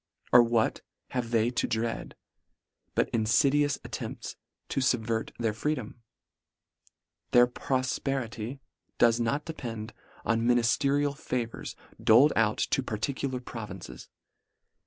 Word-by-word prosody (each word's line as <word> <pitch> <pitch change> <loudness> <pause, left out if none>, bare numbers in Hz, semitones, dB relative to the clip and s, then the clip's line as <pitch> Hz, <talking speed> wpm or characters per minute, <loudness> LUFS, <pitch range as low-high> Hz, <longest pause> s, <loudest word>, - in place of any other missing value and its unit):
Or 125 - +10
what 115 -1 +1 0.3
have 125 -2 -2
they 115 0 +2
to 125 - 0
dread, 115 +1 -2 0.8
but - - +3
infidious 140 +6 +3
attempts - - -6 0.3
to - - -1
fubvert 115 -3 0
their 115 -2 0
freedom? 120 -1 -3 1.3
Their 120 0 +8
profperity 130 -1 -2 0.4
does 115 0 +4
not 140 +6 0
depend 115 -8 -6 0.3
on 115 0 +2
minifterial 135 +4 +2
favours 125 -5 -4 0.3
doled 125 +7 +6
out 110 -1 +2
to 135 - +1
particular 130 +3 -2
provinces. 110 -7 -8
120 Hz, 105 wpm, -29 LUFS, 115-135 Hz, 1.3 s, Or